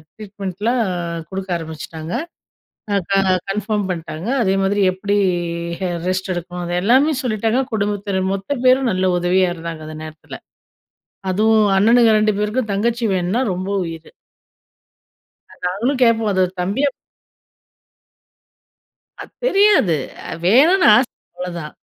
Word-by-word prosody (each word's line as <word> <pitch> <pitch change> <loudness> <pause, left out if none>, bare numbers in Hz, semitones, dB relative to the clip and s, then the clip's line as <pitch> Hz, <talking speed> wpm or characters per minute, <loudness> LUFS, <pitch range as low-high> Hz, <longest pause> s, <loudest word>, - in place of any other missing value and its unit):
ட்ரீட்மெண்ட்லாம் 205 +3 -3 0.5
குடுக்க 190 0 -6
ஆரம்பிச்சுட்டாங்க. 160 0 -7 0.8
அ - - +3
க - - +3 0.4
கன்ஃபார்ம் 210 0 -1
பண்ட்டாங்க. 165 +2 -6 0.2
அதே 190 0 +1
மாதிரி, 200 +1 +1
எப்படி 200 +2 -1 0.7
அ - - -2 0.2
ரெஸ்ட் 185 +1 -1
எடுக்கணும்? 175 +1 -5
அது 175 - -2
எல்லாமே 265 +8 +4
சொல்லிட்டாங்க. 225 +2 0
குடும்பத்தினர் 200 -2 -1
மொத்த 195 +9 -3
பேரும் 255 -1 +4
நல்ல 185 0 +1
உதவியா 180 +1 +2
இருந்தாங்க, 165 -1 -7
அந்த 155 - -8
நேரத்தில. 155 0 -10 0.9
அதுவும் 215 +2 +3
அண்ணனுக 230 +3 +5
2 215 0 +3
பேருக்கும் 215 +1 -1
தங்கச்சி 230 +3 0
வேணும்ன்னா 185 +7 0
ரொம்ப 185 +2 -4 0.2
உயிரு. 165 -1 -8 1.6
நாங்களும் 235 +9 -1
கேட்போம் 225 -3 +3
அது 185 -1 +2 0.2
தம்பிய 205 +11 0 2.3
அது - - -10
தெரியாது. 395 - +4 0.3
அ - - -7
வேணுனு 310 - +5
ஆச, 245 - +3 0.3
அவ்வளதான். 170 -4 -6
200 Hz, 115 wpm, -19 LUFS, 180-230 Hz, 2.3 s, அண்ணனுக